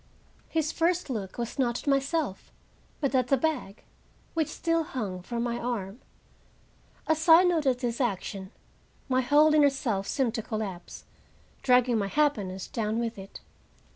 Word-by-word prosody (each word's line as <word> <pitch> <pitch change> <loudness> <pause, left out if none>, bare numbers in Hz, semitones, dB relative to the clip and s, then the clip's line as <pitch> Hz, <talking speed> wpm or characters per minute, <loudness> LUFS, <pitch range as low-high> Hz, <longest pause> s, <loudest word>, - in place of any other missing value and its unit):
His 320 -1 0
first 340 -2 0
look 200 -6 -5
was 240 +3 -4
not 240 -2 +1
at - - -9
myself, 275 - 0 0.5
but 280 -2 0
at 255 -2 +2
the 275 - +3
bag, 255 -9 -2 0.5
which 320 -3 0
still 330 -1 0
hung 210 -11 -4
from 235 +5 -3
my 240 0 -2
arm. 230 -2 -4 1.0
As 315 +1 0
I 330 +3 +9
noted 300 -8 +2
this 240 0 -2
action, 195 -4 -3 0.6
my 255 -1 +2
whole 295 +4 +5
inner 295 -2 +6
self 230 -8 -2
seemed 260 -5 0
to 230 - -2
collapse, 210 -5 -6 0.6
dragging 250 -2 +4
my 200 - -1
happiness 200 -8 0
down 220 -1 -2
with 230 -3 -3
it. 195 0 -10
250 Hz, 150 wpm, -28 LUFS, 215-295 Hz, 1.0 s, I